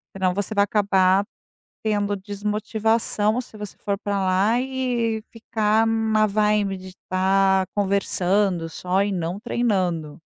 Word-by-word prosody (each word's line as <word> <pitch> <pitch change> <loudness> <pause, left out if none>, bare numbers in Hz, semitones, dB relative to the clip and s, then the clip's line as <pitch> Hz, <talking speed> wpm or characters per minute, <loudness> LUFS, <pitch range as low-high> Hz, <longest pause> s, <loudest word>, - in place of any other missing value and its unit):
senão 185 -1 +1
você 205 +2 -2
vai 200 - +5
acabar 195 -2 +3 0.6
tendo 205 -2 0
desmotivação, 210 +2 -1
se 230 -3 -14
você 210 -2 -8
for 200 -1 -2
pra 205 -1 -2
lá 195 +5 +2
e 245 -4 -1
ficar 220 -1 +1
na 220 -1 +2
vibe 210 -1 +1
de 185 0 -11 0.2
tá 190 0 +3
conversando 195 -3 +1
só 180 +3 -1
e 205 - -1
não 175 +1 -3
treinando. 185 -10 -1
205 Hz, 130 wpm, -23 LUFS, 190-215 Hz, 0.6 s, vai